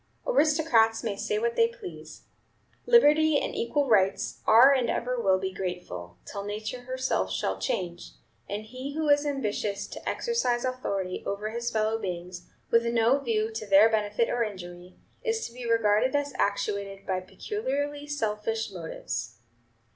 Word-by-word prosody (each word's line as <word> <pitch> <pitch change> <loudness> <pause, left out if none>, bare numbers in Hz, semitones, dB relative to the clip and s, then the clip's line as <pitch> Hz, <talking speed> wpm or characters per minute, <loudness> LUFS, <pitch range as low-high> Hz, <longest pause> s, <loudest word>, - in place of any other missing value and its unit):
"Aristocrats 300 - +3
may 215 -4 -2
say 430 - -2
what 465 +2 0
they 460 -1 +5
please, 465 -6 -10 0.6
liberty 315 -9 +6
and - - -3
equal 280 +4 0
rights 195 -5 +2
are 240 +6 +8
and 255 -3 +1
ever 250 0 -1
will 190 -3 +3
be 190 0 -4
grateful, 180 - -6
till 200 -1 -6
nature 215 +4 -5
herself 255 - -1
shall 95 0 -1
change; 175 - -3 0.4
and 205 +1 -3
he 255 +5 -7
who 310 -1 0
is 290 +1 +4
ambitious 215 -7 -2
to - - -6
exercise 265 - 0
authority 200 -8 -2
over 210 +2 -3
his 235 +1 -2
fellow 220 0 0
beings, 180 -2 -6 0.2
with 230 0 +4
no 235 +3 +3
view 225 -4 0
to 220 -1 -6
their 200 +3 +7
benefit 215 +1 +1
or 240 - -1
injury, 180 -3 -8 0.3
is 455 -2 -1
to 235 - -8
be 245 -1 -6
regarded 230 +3 +3
as 285 0 0
actuated 200 -1 -1
by 185 -1 -1
peculiarly 290 - -4
selfish 220 -5 -2
motives. 170 -4 -5
225 Hz, 155 wpm, -27 LUFS, 200-275 Hz, 0.6 s, are